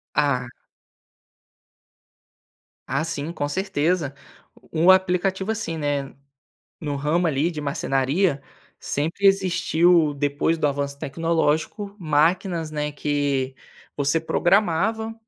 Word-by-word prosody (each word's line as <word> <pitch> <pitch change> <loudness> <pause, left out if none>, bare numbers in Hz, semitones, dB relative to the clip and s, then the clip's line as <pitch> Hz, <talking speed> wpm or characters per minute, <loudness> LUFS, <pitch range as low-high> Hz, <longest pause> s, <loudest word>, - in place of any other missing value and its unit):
Ah. 135 -4 +1 2.4
Ah 155 - 0
sim, 155 0 -4
com 145 -3 -3
certeza 165 -4 -1 0.6
o 165 +3 +4
aplicativo, 190 +1 +2
assim, 170 -8 -4
né, 145 -2 -2 0.7
no 145 -3 -3
ramo 150 +5 0
ali 150 +3 +1
de 155 - -6
marcenaria, 140 +3 0 0.4
sempre 160 +7 -2
existiu 175 -4 +3
depois 145 +3 0
do 150 - +1
avanço 140 0 -3
tecnológico, 165 +6 -1
máquinas, 165 +2 +1
né, 150 -1 -2
que 140 -2 -1 0.4
você 145 +3 +1
programava, 205 +6 +1
155 Hz, 100 wpm, -23 LUFS, 145-180 Hz, 2.4 s, o